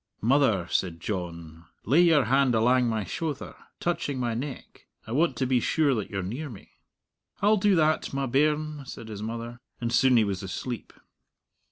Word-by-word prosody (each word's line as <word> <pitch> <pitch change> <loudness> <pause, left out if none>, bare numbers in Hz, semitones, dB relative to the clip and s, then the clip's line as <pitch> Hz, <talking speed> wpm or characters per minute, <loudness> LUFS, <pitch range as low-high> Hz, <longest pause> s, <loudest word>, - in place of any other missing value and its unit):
"Mother," 115 -7 +3
said 85 -3 0
John, 85 -4 -6 0.2
"lay 145 - +5
your 165 -5 +5
hand 130 0 +3
alang 125 +2 +3
my 110 -2 -1
shouther, 145 - -4 0.2
touching 145 -6 -2
my 120 -2 -1
neck. 130 +3 -7 0.2
I 110 - -9
want 160 +7 +2
to 130 - -1
be 125 -1 +2
sure 145 +3 +2
that 110 -5 -3
you're 95 -2 -3
near 125 +11 -5
me." 110 -6 -12 0.7
"I'll 210 +1 +5
do 200 0 +3
that, 155 -1 +2
my 135 0 -1
bairn," 150 +2 0
said 110 - -8
his 105 -1 -7
mother. 115 +2 -5 0.2
And 115 -1 -2
soon 130 0 +5
he 115 - +5
was 100 -3 -2
asleep. 110 +5 -5
125 Hz, 175 wpm, -27 LUFS, 110-145 Hz, 0.7 s, lay